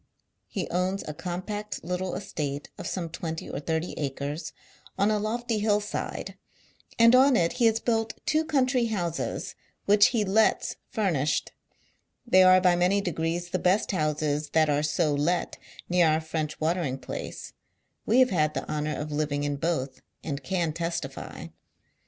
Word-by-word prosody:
He 190 -5 -3
owns 185 +2 0
a 150 - -4
compact 185 +6 -5
little 180 +2 -2
estate 150 -7 -4
of - - -5
some 175 -3 -3
twenty 160 0 -5
or - - -4
thirty 160 +3 -2
acres 145 +2 -3 0.5
on 200 +2 +3
a 210 - +1
lofty 225 +1 -1
hill 210 0 +2
side, 210 0 -5 0.6
and 230 +1 +7
on 260 +1 +6
it 170 -5 +2
he 230 - +7
has 225 0 +2
built 225 -1 -1
two 310 +1 +2
country 260 -5 +2
houses 175 -7 -3 0.3
which 205 0 +6
he 225 -4 0
lets 215 +3 +2
furnished. 165 - 0 0.7
They 185 -6 +5
are 185 0 +7
by 180 -1 +4
many 180 +3 +3
degrees 175 -1 -2
the 185 - 0
best 185 +5 +2
houses 150 -3 -1
that 155 -2 +4
are 145 0 +2
so 150 0 +1
let 160 +5 0 0.3
near 175 -1 +4
our 155 0 +3
French 160 -1 -4
watering 160 -4 0
place; 130 - -7 0.5
we 230 - +2
have 255 - +4
had 155 -4 +1
the - - -3
honour 150 0 -2
of 150 0 -5
living 145 -1 -1
in 145 0 -1
both, 140 -4 -2 0.2
;illli 145 -2 -4
Can 170 0 -1
testily. 165 -4 -5
175 Hz, 160 wpm, -27 LUFS, 155-205 Hz, 0.7 s, and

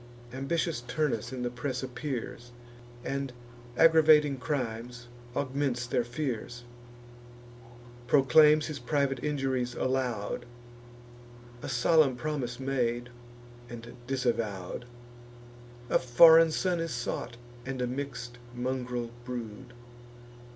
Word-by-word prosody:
Ambitious 155 +2 -1
Turnus 130 -3 -1
in 130 -1 -4
the 120 - -2
press 130 +1 -3
appears, 125 -2 -5 0.6
And, 140 -1 -2 0.5
aggravating 155 -3 +6
crimes, 125 -3 -4 0.3
augments 135 -3 -1
their 120 0 0
fears; 120 -2 -4 1.4
Proclaims 150 +3 +6
his 150 -3 -5
private 135 0 0
injuries 135 -4 -1
aloud, 125 -3 -2 1.1
A - - -5
solemn 135 +2 +4
promise 125 -3 -3
made, 125 -2 -1 0.6
and 120 0 -9
disavow'd; 115 -6 -2 1.0
A - - +3
foreign 160 +6 +7
son 175 +2 0
is 165 0 -2
sought, 120 0 -4 0.3
and 130 0 -5
a 125 - +1
mix'd 125 -2 -5 0.2
mungril 125 -1 -3
brood. 120 0 -7
130 Hz, 95 wpm, -29 LUFS, 120-145 Hz, 1.4 s, foreign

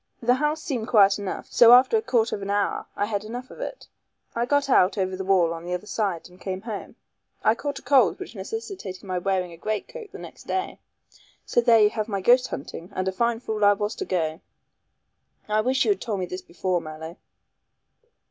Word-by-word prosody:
The 245 +1 +3
house 300 +4 -1
seemed 250 -10 -3
quiet 200 -3 +5
enough, 200 -2 -4
so 235 0 +8
after 255 - +6
a 440 - +3
quarter 235 - +1
of 200 - -8
an 195 - -5
hour 205 0 0
I 205 - 0
had 205 -1 -2
enough 245 +4 -7
of - - -12
it. - - -6 0.5
I 235 +1 0
got 285 0 +2
out 200 -7 +4
over 190 -1 -1
the 190 - -4
wall 185 -3 +3
on 165 0 -8
the 180 +1 -2
other 180 - -7
side 200 -6 -2
and 180 0 -19
came 190 -1 -4
home. 220 -2 -7 0.5
I 215 - +5
caught 285 +4 -4
a - - -10
cold 255 -10 +4
which - - -8
necessitated 210 - -6
my 185 -2 -2
wearing 185 -1 -1
a 170 - -11
great 215 +4 -3
coat - - -9
the - - -9
next - - -12
day. 375 +1 -2 0.7
So 240 - +2
there 230 -2 +5
you 210 0 +5
have 215 -1 -3
my 200 -3 -2
ghost 250 +6 +4
hunting, 165 +5 -7
and 185 0 -1
a - - +1
fine 235 +4 0
fool 215 -3 -3
I 205 0 +7
was 205 +2 -2
to - - -3
go." 160 -2 -2 1.1
"I 215 0 +2
wish 260 +3 +1
you - - +4
had 395 - -1
told 210 -5 -2
me 185 - -1
this 180 +1 -6
before, 180 0 -2
Mallow." 160 +3 -8
210 Hz, 225 wpm, -25 LUFS, 185-245 Hz, 1.1 s, so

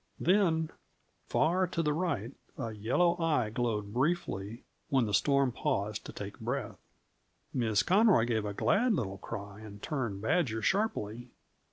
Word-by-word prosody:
Then, 170 -4 +2 0.6
far 180 +4 +2
to 165 -1 -1
the 150 -1 +1
right, 145 - -1 0.3
a 115 -4 -3
yellow 130 +12 +2
eye 150 -10 +1
glowed 105 -3 -2
briefly 120 - -1 0.3
when 130 -4 +3
the 105 - -3
storm 140 +2 +3
paused 105 -7 -2
to - - -6
take - - -7
breath. - - -3 0.7
Miss 110 -4 +2
Conroy 195 - +5
gave 115 -3 0
a 100 -1 -4
glad 230 - +3
little 100 - -3
cry 100 -1 -7
and 105 -2 -10
turned 120 -7 -3
Badger 115 - 0
sharply. 120 - -1
125 Hz, 145 wpm, -31 LUFS, 105-165 Hz, 0.7 s, Conroy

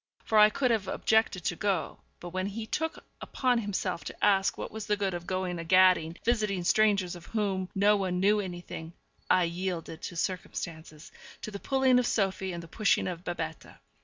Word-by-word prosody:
For 220 - +3
I 210 0 +8
could 250 +3 +1
have 215 -4 0
objected 220 -5 +1
to 175 - -1
go; 190 -2 -1 0.2
but 175 - -7
when 185 +2 -2
he 220 +2 -5
took 320 +8 -3 0.2
upon 250 -2 +1
himself 195 -4 -2
to - - -2
ask 195 -2 +3
what - - -5
was 220 -1 -6
the 210 - +1
good 195 -2 -1
of 175 0 -6
going 185 -2 -2
a - - -4
gadding, 180 -1 +4
visiting 215 -6 +1
strangers 200 -2 +2
of 175 0 -12
whom 195 -4 -1
no 205 +2 +4
one 185 -3 -1
knew 205 +3 +3
anything, 175 -3 -6 0.4
I 185 - +5
yielded 170 -1 -4
to 175 - -6
circumstances 165 -3 -5 0.3
to 215 - -5
the 200 - -6
pulling 265 0 +3
of 245 - 0
Sophie 190 -2 0
and 170 -1 -6
the - - -11
pushing 215 +4 +1
of 175 -1 -5
Babette. 165 -3 -5
190 Hz, 190 wpm, -29 LUFS, 175-210 Hz, 0.4 s, I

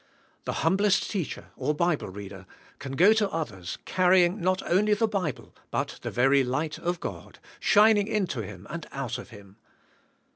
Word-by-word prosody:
The - - -2
humblest 195 0 +2
teacher 190 -7 -4
or 150 - -1
Bible 170 -1 0
reader 95 0 -9 0.3
can 135 -1 -6
g 180 - +6
o 215 - +8
to 215 -2 +1
others, 105 - -4
carrying 185 +1 +3
not 185 +1 +1
only 210 +4 +3
the 225 +2 +1
Bible, 185 - -3 0.2
but - - -3
the - - -4
very 135 +2 +3
light 145 +5 -2
of 175 0 -2
God, - - -7 0.2
shining 210 -1 +5
into 195 - -1
him 100 -2 -9
and 165 -1 -6
out 130 -4 -4
of - - -10
him. 100 -2 -14
170 Hz, 170 wpm, -27 LUFS, 125-195 Hz, 0.3 s, o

